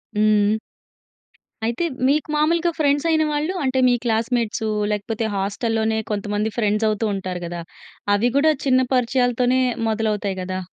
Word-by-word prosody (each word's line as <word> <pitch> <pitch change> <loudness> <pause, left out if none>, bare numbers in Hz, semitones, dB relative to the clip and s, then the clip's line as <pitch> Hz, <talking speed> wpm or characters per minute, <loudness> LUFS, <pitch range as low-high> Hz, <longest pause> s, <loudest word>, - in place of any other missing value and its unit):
హ్మ్. 210 0 +3 1.1
అయితే, 235 +8 -1 0.2
మీకు 295 +3 +1
మాములుగా 335 +3 +2
ఫ్రెండ్సయిన 315 +2 +2
వాళ్ళు 300 +5 -1
అంటే, 260 -1 +1
మీ 245 - +4
క్లాస్‌మెట్సూ 230 -1 0 0.2
లేకపోతే, 215 +2 -2
హాస్టల్‌లోనే 220 +3 -1
కొంతమంది 210 +1 -1
ఫ్రెండ్సవుతూ 215 0 +1
ఉంటారు 185 -2 -4
గదా! 170 0 -5 0.5
అవి 235 +4 +2
గూడా 315 +2 +5
చిన్న 260 -1 +4
పరిచయాలతోనే 250 0 +2 0.3
మొదలవుతాయి 210 -3 -1
గదా! 185 0 -3
225 Hz, 120 wpm, -21 LUFS, 210-260 Hz, 1.1 s, గూడా